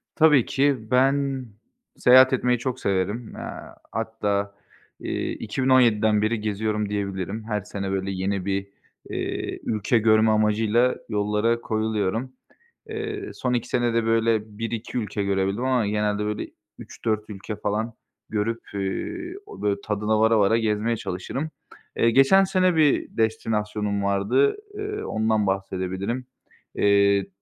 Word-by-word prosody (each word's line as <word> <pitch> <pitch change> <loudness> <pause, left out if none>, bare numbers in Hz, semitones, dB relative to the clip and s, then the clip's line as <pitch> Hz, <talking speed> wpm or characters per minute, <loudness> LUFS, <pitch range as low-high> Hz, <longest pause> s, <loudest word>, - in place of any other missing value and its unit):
Tabii 150 -6 +5
ki. 140 0 +2
Ben 135 0 +2 0.5
seyahat 130 +1 +7
etmeyi 125 -1 +2
çok 130 0 -3
severim. 100 +3 -1
Eee, - - -7 0.5
hatta, 105 -3 -2 0.4
iii, - - -3
2017'den 115 -3 +3
beri 110 +1 0
geziyorum 105 0 -1
diyebilirim. 100 +1 -3
Her 105 -2 -2
sene, 100 -1 -5
böyle, 95 0 -2
yeni 95 0 -2
bir, 100 0 -1 0.4
iii, - - -3
ülke 110 +2 +1
görme 110 0 +4
amacıyla 110 +3 +2
yollara 105 +2 +1
koyuluyorum. 110 +2 -1 0.6
Eee, 425 -2 -4
son 125 -1 -2
2 125 0 -1
senede 115 -2 +1
böyle 115 -2 +1
1-2 115 +1 -4
ülke 105 -2 -2
görebildim 100 +3 0
ama 125 -5 +1
genelde, 105 0 0
böyle, 105 0 -3 0.3
3-4 110 -1 -3
ülke 105 +1 -6
falan 110 +3 -2 0.4
görüp, 110 +2 -1
ııı, 345 - -3
o 425 - -11
böyle 100 -1 0
tadına 105 +1 0
vara 110 0 +4
vara 105 +3 +4
gezmeye 110 +1 0
çalışırım. 100 - -4 0.5
Eee, 115 - +4
geçen 135 +10 +6
sene 185 -2 +2
bir 155 -3 +2
destinasyonum 105 -2 -1
vardı, 100 +8 +2 0.2
ııı, 415 0 -4
ondan 110 -2 +1
bahsedebilirim. 95 +5 -2 0.5
Eee, 100 -1 +3
110 Hz, 125 wpm, -24 LUFS, 100-125 Hz, 0.6 s, seyahat